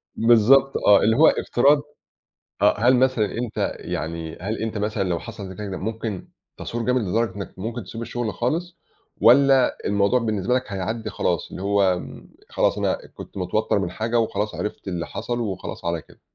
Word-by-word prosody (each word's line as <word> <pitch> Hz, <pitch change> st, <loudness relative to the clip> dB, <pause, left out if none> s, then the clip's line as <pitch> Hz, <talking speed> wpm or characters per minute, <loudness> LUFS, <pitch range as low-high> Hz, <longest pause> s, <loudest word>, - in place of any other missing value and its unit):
بالضبط 120 Hz, +4 st, +5 dB
آه، 100 Hz, -1 st, +5 dB
اللي 110 Hz, -, +3 dB
هو 155 Hz, +5 st, +6 dB
افتراض 140 Hz, +4 st, +3 dB, 0.8 s
آه. 105 Hz, 0 st, +4 dB
هل 125 Hz, +4 st, +5 dB
مثلًا 130 Hz, -3 st, +3 dB
أنت 120 Hz, -2 st, -2 dB
يعني 80 Hz, +1 st, -5 dB
هل 105 Hz, +4 st, -3 dB
أنت 110 Hz, -1 st, -3 dB
مثلًا 105 Hz, 0 st, -1 dB
لو 85 Hz, -2 st, 0 dB
حصل 105 Hz, -3 st, -8 dB
ده 95 Hz, -, -9 dB
كده 105 Hz, +1 st, -6 dB
كده 95 Hz, -1 st, -4 dB
ممكن 110 Hz, -2 st, -4 dB, 0.3 s
تثور 120 Hz, 0 st, -4 dB
جامد 125 Hz, 0 st, +2 dB
لدرجة 110 Hz, +3 st, -1 dB
إنّك 100 Hz, -1 st, -7 dB
ممكن 115 Hz, +3 st, -4 dB
تسيب 115 Hz, +5 st, -8 dB
الشغل 115 Hz, -2 st, -3 dB
خالص، 170 Hz, +8 st, -2 dB, 0.4 s
والّا 135 Hz, +1 st, +5 dB
الموضوع 100 Hz, +5 st, +2 dB
بالنسبة 110 Hz, -1 st, -1 dB
لك 130 Hz, 0 st, +1 dB
هيعدي 110 Hz, +4 st, -3 dB
خلاص، 85 Hz, -6 st, -1 dB
اللي -, -, -7 dB
هو 100 Hz, +1 st, +2 dB
آمم، 90 Hz, -, -8 dB, 0.2 s
خلاص، -, -, +1 dB
أنا -, -, -1 dB
كنت -, -, -11 dB
متوتّر 100 Hz, +3 st, 0 dB
من 90 Hz, -3 st, -2 dB
حاجة، 115 Hz, +4 st, 0 dB
وخلاص 105 Hz, -2 st, -1 dB
عرفت 105 Hz, -1 st, -5 dB
اللي 85 Hz, -2 st, -3 dB
حصل، 115 Hz, +4 st, -4 dB
وخلاص 100 Hz, -7 st, -5 dB
على 85 Hz, -1 st, -1 dB
كده؟ -, -, -21 dB
110 Hz, 180 wpm, -23 LUFS, 100-120 Hz, 0.8 s, هو